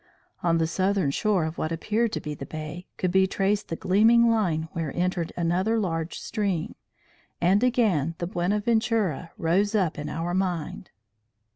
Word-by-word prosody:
On 170 -1 +2
the 165 - +2
southern 185 -2 +1
shore 195 +1 +1
of 160 +1 -5
what 155 - -2
appeared 215 +7 0
to - - -1
be 150 - -5
the 140 - -8
bay, 155 +3 -7
could 185 - 0
be 190 +1 +4
traced 200 +2 0
the 165 - -3
gleaming 230 +7 +4
line 170 -8 0
where 160 -4 -3
entered 175 -1 -1
another 180 +6 +1
large 165 -5 -2
stream; 200 -7 -2 0.7
and 190 +6 +3
again 200 - +2
the 175 - -3
Buenaventura 205 - 0
rose 200 +4 +1
up 180 -7 +1
in 150 0 -4
our 165 +3 -3
mind. 180 -4 -2
180 Hz, 160 wpm, -26 LUFS, 165-210 Hz, 0.7 s, be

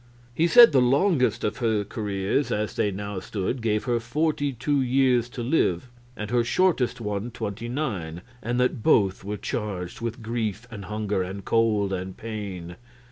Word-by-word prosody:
He 165 +7 +2
said 240 +5 +9
the 135 -3 +4
longest 135 +3 +2
of 105 - -1
her 110 -4 +1
careers 105 +4 -2
as 105 0 -2
they 105 - +1
now 100 0 -4
stood 105 +6 -3
gave 105 -2 0
her 120 -2 0
forty 145 +4 0
two 135 +3 0
years 125 -2 +2
to 120 -1 -6
live, 120 - +1 0.3
and 105 0 -5
her 120 -1 +3
shortest 140 -2 +1
one 105 +1 -3
twenty 110 0 -5
nine, 95 - -3 0.2
and 120 +2 -1
that 125 -2 +1
both 95 -3 +3
were 105 +1 -4
charged 95 -4 -4
with 115 +1 -4
grief 115 0 -3
and 100 -4 -7
hunger 105 -1 -2
and 95 +2 -5
cold 105 -4 +2
and 95 0 -5
pain. 100 -6 -6
110 Hz, 170 wpm, -25 LUFS, 100-125 Hz, 0.3 s, said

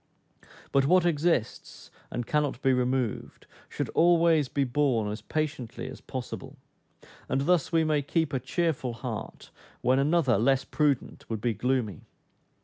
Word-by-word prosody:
But 135 0 +3
what 180 +2 +4
exists, 165 -7 -1 0.2
and 120 - -4
cannot 150 -3 0
be 135 - +4
removed, 125 -2 -1 0.2
should - - -3
always 165 -4 +4
be 140 - 0
borne 125 -5 +1
as 105 0 -6
patiently 130 -4 -3
as 130 - -10
possible; 135 +2 -7 0.7
and 135 +1 +1
thus 175 +2 +2
we 165 -1 +3
may 155 -2 +1
keep 155 +1 -1
a 130 - +1
cheerful 135 -2 -1
heart, 115 - -7 0.3
when 130 +2 +3
another, 140 - +3
less 135 +3 +2
prudent, 145 -4 -1
would 110 -2 -2
be 115 +2 0
gloomy. 120 -6 -1
135 Hz, 145 wpm, -28 LUFS, 125-155 Hz, 0.7 s, what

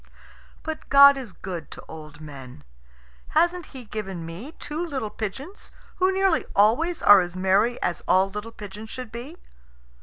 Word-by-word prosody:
But 315 -1 -6
God 280 0 +9
is 260 -6 -7
good 175 -3 -7
to - - -11
old 150 -1 -11
men. 135 - -11 0.7
Hasn't 345 +1 +2
He 260 -3 -10
given 195 -6 -5
me 190 - -8
two 305 +1 -5
little 265 -10 -4
pigeons, 270 - -7 0.3
who 375 0 +3
nearly 385 -3 +2
always 250 - +3
are 205 -2 +9
as 175 0 -5
merry 195 +6 +2
as 175 - -1
all 190 +1 +4
little 210 +3 -6
pigeons 210 0 -9
should 255 -2 -7
be? 255 +9 -8
220 Hz, 155 wpm, -25 LUFS, 185-295 Hz, 0.7 s, God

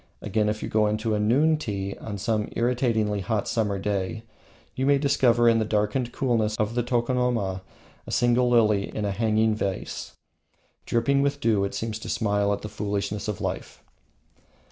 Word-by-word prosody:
Again, 105 -1 0
if 105 0 -3
you - - -2
go 105 -1 +2
into 110 +1 -1
a 105 - +1
noon 140 +9 +3
tea 100 -8 -4
on 105 -2 -5
some 105 +2 -1
irritatingly 115 -4 +1
hot 105 +2 -1
summer 105 -3 0
day, 100 +2 -2 0.5
you 130 +1 0
may 140 0 +5
discover 130 -4 +3
in 115 -1 +5
the - - +2
darkened 110 +3 0
coolness 115 -5 0
of 110 +1 -1
the 120 - +1
tokonoma 120 -5 0 0.5
a - - -6
single 120 0 +3
lily 105 -4 +3
in 105 - -1
a 100 - 0
hanging 110 +1 +2
vase; 100 -3 -4 0.7
dripping 140 +4 +2
with 140 0 0
dew, 110 -5 +2
it 100 - -5
seems 110 -1 -3
to - - -8
smile 100 -2 +1
at 100 - -2
the - - -4
foolishness 105 -1 -3
of 105 -3 -3
life. - - -5
110 Hz, 175 wpm, -25 LUFS, 105-120 Hz, 0.7 s, may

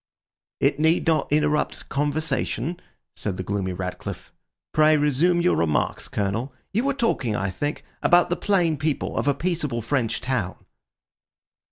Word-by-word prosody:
"It 140 +1 +2
need 160 +2 +3
not 160 -4 +1
interrupt 150 0 +1
conversation," 150 +2 -1 0.4
said 100 -3 -3
the 95 - -3
gloomy 95 -1 -2
Ratcliffe. 90 0 -6 0.4
"Pray 155 0 +5
resume 150 +5 +3
your 180 - +3
remarks, 75 -3 0
Colonel. 105 +7 -2 0.2
You 230 +6 +1
were 280 -1 +1
talking, 135 - 0
I 95 -1 -1
think, 145 - -3 0.2
about 175 0 +4
the - - +3
plain 175 -6 +1
people 150 0 -1
of - - -1
a 140 - +3
peaceable 155 -10 -2
French 120 -2 0
town." 120 -8 -2
145 Hz, 145 wpm, -24 LUFS, 115-165 Hz, 0.4 s, Pray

